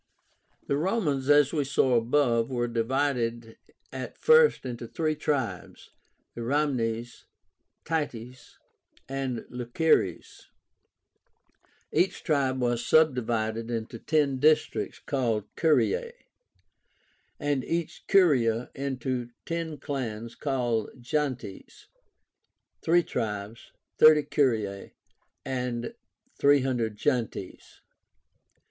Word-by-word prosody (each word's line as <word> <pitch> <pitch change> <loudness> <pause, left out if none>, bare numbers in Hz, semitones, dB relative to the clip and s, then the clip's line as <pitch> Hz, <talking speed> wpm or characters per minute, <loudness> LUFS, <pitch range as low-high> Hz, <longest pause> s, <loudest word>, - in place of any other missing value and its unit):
The 140 - 0
Romans, 150 - 0
as 145 0 +5
we 150 -3 +1
saw 135 -1 +2
above, 120 0 +2
were 120 -2 -1
divided 120 -1 -1 0.4
at - - -6
first 470 - +5
into 120 -2 -5
three 155 +4 -1
tribes, 145 -5 -3 0.4
Ramnes, 120 -2 -1 0.6
Tities, 125 -6 -4 0.5
and 135 -3 -3
Luceres 125 - 0 1.5
Each 175 +4 +1
tribe 135 -4 +1
was 120 -1 0
subdivided 115 -7 +1
into 115 0 -4
ten 145 -3 +1
districts 155 +2 +2
called 120 -7 -1
CURIAE, 465 - +2 1.3
and 145 -3 0
each 170 -1 -3
curia 125 - +3
into 130 -3 -3 0.2
ten 165 -2 -3
clans 120 -5 -5
called 125 -5 -2
GENTES 130 -5 -4 0.9
(3 175 +1 +3
tribes, 105 -2 -5 0.3
30 155 -1 +7
curiae, 110 -10 -1 0.5
and 125 - -3 0.5
300 130 -6 +2
gentes). 115 -7 -3
130 Hz, 85 wpm, -27 LUFS, 115-150 Hz, 1.5 s, 30